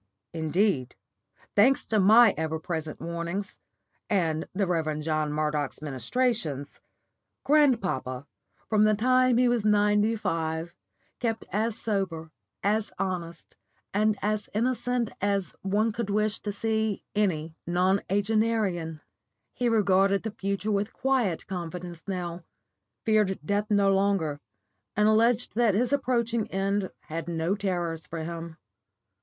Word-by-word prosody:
Indeed, 160 - 0 0.6
thanks 255 +6 +4
to 220 - +1
my 220 +3 +7
ever 160 0 -2
present 160 -2 -4
warnings, 170 +4 -4 0.5
and 165 -6 0
the 195 +1 0
Rev. 160 -4 -1
John 155 -1 -1
Murdoch's 150 -2 -1
ministrations, 150 - -2 0.6
grandpapa, 195 - +2 0.4
from 215 -1 +4
the 215 0 +4
time 255 +2 +3
he 250 0 +4
was 240 -3 +1
ninety 210 +1 +3
five, 165 -3 -2 0.5
kept 225 -2 -2
as 215 +3 0
sober, 180 -7 -2 0.3
as 210 +1 +1
honest, 170 -3 -4 0.4
and 210 +1 +2
as 210 0 -1
innocent 245 0 0
as 200 -1 0
one 210 +4 +1
could 215 -1 -4
wish 210 +1 +1
to 210 - -3
see 220 0 -1
any 170 -7 0
nonagenarian. 195 -1 +1 0.5
He 245 -1 0
regarded 195 -2 +3
the 220 - -3
future 200 +1 -2
with 205 +1 -1
quiet 250 -10 0
confidence 175 -1 -6
now, 175 -2 -4 0.6
feared 210 -3 +2
death 205 +3 0
no 200 -2 +4
longer, 190 -7 +1 0.6
and 210 +1 +3
alleged 230 +2 +3
that 225 -3 +3
his 245 +5 +1
approaching 235 -5 0
end 195 0 0
had 165 +1 -6
no 165 +2 0
terrors 175 -5 -2
for 165 -1 -5
him. 165 0 -6
200 Hz, 125 wpm, -27 LUFS, 165-220 Hz, 0.6 s, my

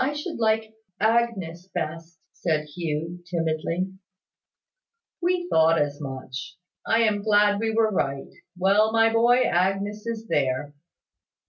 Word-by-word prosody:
"I 280 +3 0
should 300 +1 -5
like 220 -1 +1 0.3
Agnes 210 -7 0
best," 165 -1 -5
said 155 -3 -1
Hugh, 165 +2 -4
timidly. 165 +2 -1 1.3
"We 350 0 0
thought 160 - +4
as 145 0 -1
much. 130 -1 -7 0.3
I 225 +1 +3
am 210 -2 +2
glad 205 -1 +3
we 225 +1 0
were 220 -1 +2
right. 135 -7 -2 0.2
Well, 200 +4 +3
my 225 0 +4
boy, 240 +2 +4
Agnes 195 +4 0
is 225 -1 -4
there." 140 -1 0
190 Hz, 125 wpm, -25 LUFS, 160-225 Hz, 1.3 s, thought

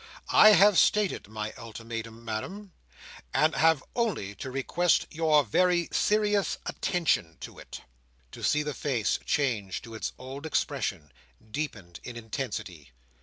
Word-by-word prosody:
I 215 0 +9
have 205 -1 +6
stated 210 - +2
my 110 0 -5
ultimatum, 115 0 -7
Madam, 185 - -5 0.6
and 155 0 +3
have 160 -2 +3
only 210 - -1
to 115 +6 -7
request 155 +6 +1
your 155 -2 +3
very 175 - +2
serious 210 -1 +1
attention 150 - 0
to - - -9
it." - - -10 0.5
To - - -10
see 150 0 +2
the 150 0 -3
face 125 -8 -1
change 115 -10 -1
to 115 -1 -10
its 110 - -4
old 135 +4 -7
expression, 75 - -2 0.4
deepened 105 - -5
in 125 - -8
intensity! 105 - -6
135 Hz, 130 wpm, -28 LUFS, 110-175 Hz, 0.6 s, I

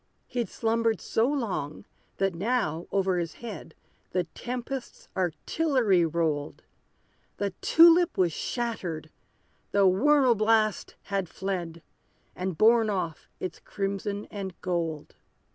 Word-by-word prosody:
He'd 245 -2 -3
slumbered 230 0 +1
so 225 +2 +1
long, 210 - -2 0.3
that 195 -1 +1
now, 175 -4 -1
over 190 -2 +1
his 165 -3 -3
head, 230 -5 -8 0.4
The 180 0 +2
tempest's 250 +1 -5
artillery 190 - +2
rolled; 155 -3 -1 0.7
The 200 -1 -1
tulip 335 -1 +6
was 175 -4 +2
shattered 180 -11 -3 0.6
the 200 -1 +3
whirl 260 +7 +5
blast 215 -2 +1
had 195 -4 -2
fled, 175 -3 -4 0.5
And 185 -2 -3
borne 225 +2 +5
off 175 -6 -3
its 185 - -5
crimson 200 +1 -3
and 195 -3 -6
gold. 165 -4 -3
195 Hz, 110 wpm, -28 LUFS, 175-230 Hz, 0.7 s, tulip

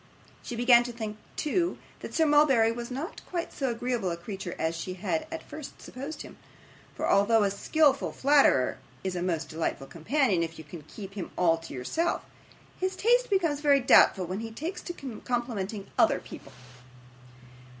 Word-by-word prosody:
She 240 - -6
began 240 0 +6
to 240 - -4
think, 220 -2 -5 0.2
too, 345 +3 0 0.2
that - - -7
Sir 320 - +4
Mulberry 285 -7 +5
was 235 0 -5
not 285 - -5
quite 345 -2 -3
so 270 -2 -1
agreeable 235 -4 -1
a 170 - -3
creature 185 0 -6
as 160 +1 -1
she 185 +2 -5
had 180 -4 -2
at 325 - -6
first 305 -3 -9
supposed 275 +5 -7
him; - - -12 0.6
for, - - -2
although 210 +2 +4
a 200 - +1
skilful 280 +6 +2
flatterer 275 - +3 0.2
is 190 -1 -2
a 175 - -2
most 165 -4 -1
delightful 160 -4 -3
companion 190 - +1
if 165 0 -3
you 160 - -9
can 160 +2 -9
keep 195 +1 -9
him 195 -4 -5
all 165 -2 +3
to 165 - -9
yourself, 320 - -1 0.5
his 375 +1 -1
taste - - +3
becomes 335 -8 +1
very 285 -2 +5
doubtful 195 -7 +5
when 185 +3 -4
he 225 0 -5
takes 330 - -5
to 275 -10 -7
complimenting 225 -5 -2
other - - +5
people. - - -11
230 Hz, 175 wpm, -28 LUFS, 185-290 Hz, 0.6 s, began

